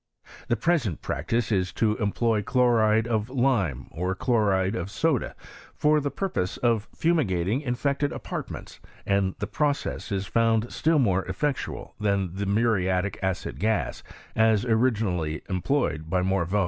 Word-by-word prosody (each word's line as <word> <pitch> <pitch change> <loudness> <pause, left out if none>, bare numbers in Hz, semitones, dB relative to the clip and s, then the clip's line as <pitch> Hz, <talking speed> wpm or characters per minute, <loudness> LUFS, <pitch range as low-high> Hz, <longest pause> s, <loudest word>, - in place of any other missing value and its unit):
The 120 - +2
pre 165 +10 +2
sent 100 - -5
practice 110 +11 -1
is 95 -3 +1
to 110 -2 +1
employ 110 0 +1
chloride 110 -2 +3
of 110 -1 -1
lime, 120 - +1
or 90 +3 -2
chloride 100 -4 +1
of 90 -5 -3
goda, 125 +6 0 0.4
for 150 0 +3
the 145 -1 -1
purpose 140 - -2
of 115 -3 +1
fumigating 120 - +1
in 125 -4 -2
fected 140 +2 0
apartments, - - -6 0.3
and 100 -1 +1
the 105 - -2
process 145 +5 -2
is 100 -1 -1
found 115 +2 +1
still 160 0 +2
more 95 -8 +2
effectual 135 +10 -3
than 100 -4 0
the 100 +1 -3
muriatic 100 -3 +1
acid 95 -1 -2
gas, 110 +1 0 0.3
as 110 -1 +3
origi 115 -1 +2
nally 80 -6 -2
employed 90 - -1
by 90 +1 +1
Morveau. 95 +1 +1
110 Hz, 150 wpm, -26 LUFS, 95-125 Hz, 0.4 s, chloride